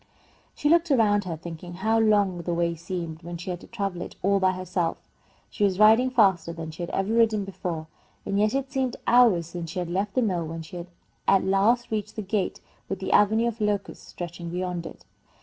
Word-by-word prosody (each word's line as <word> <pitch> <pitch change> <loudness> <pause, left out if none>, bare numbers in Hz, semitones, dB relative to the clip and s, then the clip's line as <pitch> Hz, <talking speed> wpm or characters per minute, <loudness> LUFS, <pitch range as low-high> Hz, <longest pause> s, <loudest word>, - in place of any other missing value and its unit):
She 295 - -1
looked 335 +2 +4
around 210 -7 +3
her, 165 -3 -4
thinking 170 +2 -8
how 220 +5 +1
long 205 -5 +3
the 170 0 -2
way 170 0 +1
seemed 170 -1 -5
when 170 0 -6
she 180 +2 -5
had 175 - -5
to - - -13
travel 195 -6 -3
it - - -7
all 200 +1 +3
by 185 -1 +3
herself. 180 -2 -2 0.5
She 210 - -2
was 195 -2 +2
riding 220 +5 +6
faster 195 -9 +3
than 165 -1 -6
she 160 - -9
had 175 - -3
ever 195 +3 -1
ridden 220 -3 +3
before, 175 -4 -5 0.4
and 200 - 0
yet 215 +4 +2
it 270 0 -2
seemed 260 -3 -1
hours 235 -9 +5
since 170 0 -6
she - - -7
had 175 -1 -2
left 195 +3 -1
the 255 - +3
mill 175 -6 -1
when 165 0 -6
she 175 +1 -8 0.4
at 195 -1 +5
last 210 +6 +2
reached 210 -1 -3
the 215 - -4
great 190 - -19
gate 200 -3 -1 0.3
with 195 - -2
the 190 - -4
avenue 220 +3 +4
of 230 -1 -4
locusts 210 -1 -2
stretching 175 -1 -7
beyond 180 -1 -3
it. - - -13
195 Hz, 220 wpm, -26 LUFS, 175-215 Hz, 0.5 s, riding